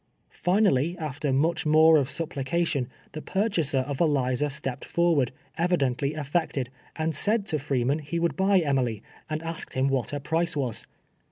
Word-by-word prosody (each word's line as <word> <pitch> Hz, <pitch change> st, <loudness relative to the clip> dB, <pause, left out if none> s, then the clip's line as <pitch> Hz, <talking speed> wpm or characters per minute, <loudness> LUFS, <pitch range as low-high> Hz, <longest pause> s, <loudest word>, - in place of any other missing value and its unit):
Finally, 180 Hz, -4 st, +2 dB
after 145 Hz, -3 st, -3 dB
much 160 Hz, +5 st, +1 dB
more 160 Hz, +1 st, +6 dB
of 140 Hz, -2 st, +1 dB
supplication, 150 Hz, -3 st, -1 dB, 0.2 s
the 155 Hz, -, -6 dB
pur 195 Hz, +7 st, 0 dB
chaser 150 Hz, -10 st, +1 dB
of 140 Hz, +2 st, -4 dB
Eliza 145 Hz, -3 st, +2 dB
stepped 135 Hz, -2 st, -4 dB
forward, 165 Hz, -7 st, +2 dB, 0.3 s
evidently 145 Hz, -5 st, +1 dB
alfected, 145 Hz, -3 st, -1 dB, 0.3 s
and 160 Hz, 0 st, -1 dB
said 205 Hz, +8 st, +1 dB
to 155 Hz, -7 st, -1 dB
Freeman 135 Hz, +1 st, 0 dB
he 155 Hz, +3 st, -4 dB
would 170 Hz, -4 st, 0 dB
buy 195 Hz, +3 st, +3 dB
Emily, 125 Hz, -8 st, 0 dB, 0.3 s
and 155 Hz, +1 st, -3 dB
asked 165 Hz, 0 st, -6 dB
Iiini 130 Hz, +1 st, +2 dB
what 135 Hz, -3 st, -1 dB
lier 145 Hz, -, -2 dB
price 165 Hz, +4 st, 0 dB
was. 125 Hz, -5 st, -2 dB
150 Hz, 160 wpm, -26 LUFS, 135-170 Hz, 0.3 s, more